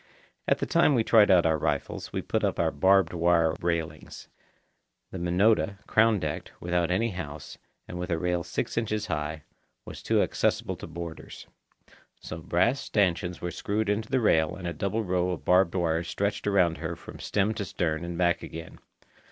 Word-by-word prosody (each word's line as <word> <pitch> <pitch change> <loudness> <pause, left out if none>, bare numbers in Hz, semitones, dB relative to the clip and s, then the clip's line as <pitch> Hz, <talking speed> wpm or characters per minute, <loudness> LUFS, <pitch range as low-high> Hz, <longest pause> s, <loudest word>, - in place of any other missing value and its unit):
At - - +3
the - - -2
time 145 - +3
we 115 - +3
tried 110 -2 +5
out 90 -3 +5
our 80 -1 +2
rifles - - -2
we - - -3
put - - -1
up - - 0
our - - +2
barbed 95 +3 +3
wire 85 -1 +3
railings. 85 -2 -4 0.8
The 95 - -6
Minota, 100 +4 +2
crown 110 0 +4
decked, 75 -5 -4
without 85 -1 0
any 110 +6 +1
house, 75 -5 -7 0.3
and 90 - -7
with 90 - -4
a 85 - +1
rail 90 0 -1
six - - -2
inches 110 -1 -2
high, 75 -4 -3 0.4
was - - -9
too - - +2
accessible - - -1
to - - -8
boarders. 85 -1 -8 0.7
So 80 - -7
brass 90 +10 +1
stanchions 90 -7 0
were 90 - -3
screwed 105 +5 -2
into 110 +2 -1
the 130 -1 +2
rail 80 -9 +2
and 90 -1 -6
a 85 - -3
double 100 +7 -2
row 90 -1 0
of 90 - -4
barbed 90 0 +4
wire 85 -2 +1
stretched 100 +4 -2
around 90 -6 +2
her 85 +1 -4
from - - -12
stem 105 +1 0
to 105 - -4
stern 80 -4 -2
and 85 0 -5
back 85 -1 +2
again. 80 0 -9
90 Hz, 185 wpm, -27 LUFS, 85-100 Hz, 0.8 s, tried